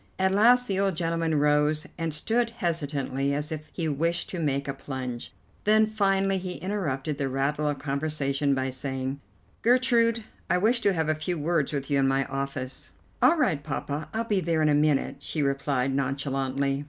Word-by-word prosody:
At 190 0 +2
last 245 +5 +5
the 195 -1 0
old 195 -2 +1
gentleman 165 -1 0
rose, 150 +1 +2
and 165 -1 -2
stood 230 +10 0
hesitating, 145 - -1
as 150 +2 -3
if 155 -1 -6
he 165 -3 -2
wished 165 +4 -1
to 180 - -4
make 140 -3 0
a 140 - -1
plunge; 130 -3 -6 0.3
then, 215 +1 +5
finally, 195 -2 +1
he 180 -1 -5
interrupted 155 -7 -3
the 135 -1 0
rattle 145 +3 0
of 145 - -2
conversation 140 -1 0
by 130 0 -1
saying: 130 +1 -4 0.4
"Gertrude, 235 -2 +3 0.3
I - - +3
wish 230 +6 +2
to 200 - +3
have 160 -3 0
a 155 - +3
few 155 +3 -3
words 155 -1 0
with 140 -1 -3
you 140 - +3
in 135 - +3
my 135 0 +2
office." 135 -1 -4 0.3
"All 335 - +5
right, 180 - +1
Poppa, 145 +1 -4
I'll 225 +1 -1
be 210 -4 +1
there 160 -2 +1
in 155 - +4
a - - +4
minute," 145 -2 +2
she 150 +1 -2
replied 135 -1 0
nonchalantly. 135 0 -1
150 Hz, 185 wpm, -27 LUFS, 140-185 Hz, 0.4 s, last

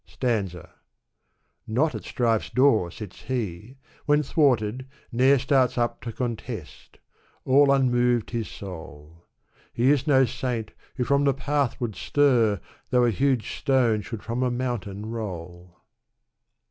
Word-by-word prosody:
SAinza, 100 -9 -1 1.0
Not 135 +8 +1
at - - -6
strife's 115 -3 0
door 125 -9 +3
sits 100 +1 -10
he; 115 -1 -4 0.3
when 150 0 +4
thwarted, 130 -4 +1 0.2
ne'er 130 +3 +4
Starts 130 -1 +2
up 120 -1 -1
to 120 - -5
contest; 120 -1 -6 0.5
all 140 +1 +5
unmoved 125 -3 +2
his 115 -2 -2
soul. 80 -3 -10 0.4
He 125 +4 +3
is 145 0 +1
no 135 -2 +5
saint 120 -3 -3 0.2
who 125 - -1
from 140 +3 +2
the 140 - +3
path 140 -2 -1
would 115 -5 -3
stir. 120 -8 +2 0.3
Though 125 -1 +3
a 120 - +3
huge 130 +1 0
stone 120 -6 +2
should 110 +1 -7
from 120 +2 -3
a 130 - +2
mountain 120 -5 -3
roll. 90 -5 -7
120 Hz, 135 wpm, -25 LUFS, 105-130 Hz, 1.0 s, all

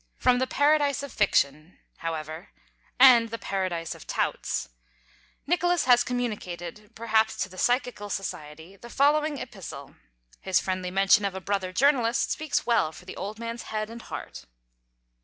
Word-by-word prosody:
From 250 -1 +3
the 260 - 0
Paradise 290 -1 +2
of 280 - -7
Fiction, 155 +5 +1 0.2
however 160 +2 -5 0.5
(and 245 -3 +8
the 230 - -4
Paradise 185 -6 -3
of - - -14
Touts), - - -2 0.8
Nicholas 350 +1 +1
has 245 -1 +6
communicated, 210 -6 -4
perhaps 220 -1 +1
to 195 - -7
the 185 0 -10
Psychical 245 -4 0
Society, 160 -2 -6
the 235 +5 -13
following 295 +3 +2
Epistle. 180 - -9 0.4
His 190 -1 +2
friendly 185 -1 -3
mention 195 +3 +4
of 200 -1 -2
a - - -3
brother 190 -1 -2
journalist 245 0 +2
speaks 310 -1 -1
well 230 -10 +2
for - - -14
the - - -8
Old 205 +3 -5
Man's 230 +1 -5
head 215 0 -3
and 230 0 -9
heart. - - -8
215 Hz, 150 wpm, -26 LUFS, 185-250 Hz, 0.8 s, and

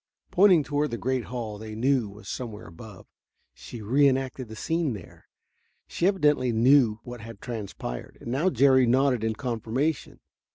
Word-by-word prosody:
Pointing 185 -4 +5
toward 145 +2 -1
the 120 - -4
great 130 +1 -1
hall 115 -4 -5
they 110 0 -8
knew 125 -1 +1
was 105 +2 -13
somewhere 115 -5 -6
above, 95 +4 -12 0.5
she 115 -3 -10
reenacted 130 +1 +1
the 110 - -9
scene 160 +3 -1
there; 100 -5 -12 0.6
she 175 - 0
evidently 150 -10 +2
knew 115 -1 +4
what 120 -2 -9
had 115 +1 -10
transpired. 105 - -6
And 120 - -7
now 150 +9 +2
Jerry 130 -3 +4
nodded 130 -1 +2
in 110 0 -1
confirmation. 120 +6 -2
125 Hz, 155 wpm, -26 LUFS, 110-140 Hz, 0.6 s, Pointing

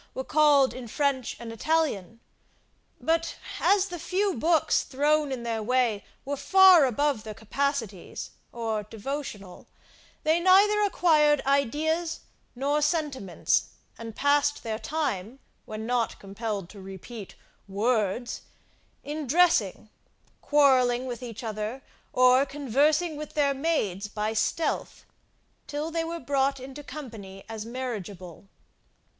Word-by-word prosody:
were 260 - -3
called 290 -2 +4
in 255 -2 -8
French 275 0 -1
and 230 -1 -7
Italian; 230 - -1 0.8
but 330 +1 0 0.2
as 395 -1 +3
the 350 -1 -6
few 390 +4 0
books 320 +5 +2
thrown 295 +2 +1
in 250 -3 -4
their 230 -1 -2
way 235 -3 +1 0.2
were 285 +1 -2
far 365 +2 +7
above 270 0 0
their 215 -1 -8
capacities, 225 -4 -3 0.2
or 225 -2 -2
devotional, 210 -3 -7 0.6
they 320 +2 +3
neither 395 +4 +5
acquired 310 -7 +4
ideas 310 +5 0 0.3
nor 285 +4 0
sentiments, 295 - 0 0.3
and 225 -1 -8
passed 290 0 +2
their 220 -1 -3
time, 255 -8 -3 0.3
when 215 0 -6
not 240 -1 -1
compelled 200 -1 -4
to 200 +1 -12
repeat 195 +3 -9 0.3
WORDS, 215 +2 -1 0.6
in 295 0 -5
dressing, 265 - +3 0.5
quarrelling 260 -4 +3
with 245 -1 -5
each 235 -2 -7
other, 220 +4 -4 0.3
or 255 +1 +5
conversing 295 +4 +1
with 300 0 -8
their 285 -2 +2
maids 265 - -1
by 215 +1 -2
stealth, 230 +9 -1 0.6
till 295 +2 -3
they 330 0 -1
were 335 +1 -4
brought 275 0 0
into 265 +3 -9
company 215 -11 -9
as 220 -1 -6
marriageable. 205 -8 -6
265 Hz, 120 wpm, -27 LUFS, 220-300 Hz, 0.8 s, far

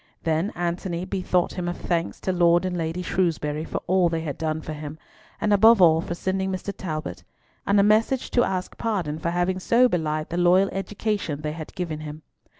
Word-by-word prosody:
Then 165 +5 0
Antony 175 0 -2
bethought 185 -2 0
him 180 -2 -4
of 175 - -3
thanks 170 -1 -2
to 185 - -1
Lord 175 0 +3
and 185 -1 -2
Lady 165 +1 -2
Shrewsbury 155 -5 -1
for - - -4
all 180 -1 +3
they 165 -1 -2
had 150 -3 -4
done 160 -1 -2
for 155 - -6
him, 150 0 -7 0.4
and 210 - +2
above 220 +2 +6
all 165 -3 +6
for 175 - -4
sending 190 +1 -1
Mr. 190 +2 -4
Talbot; 155 - -5 0.4
and 200 0 +4
a - - +5
message 220 +5 +2
to 245 - +3
ask 185 -1 -3
pardon 180 -10 -2
for 165 - -1
having 175 +2 0
so 235 +6 +4
belied 155 -6 -2
the 170 - -3
loyal 180 +2 +4
education 195 -5 -3
they 150 0 -3
had 155 0 -8
given 165 -4 -3
him. 155 0 -8
175 Hz, 200 wpm, -24 LUFS, 160-190 Hz, 0.4 s, above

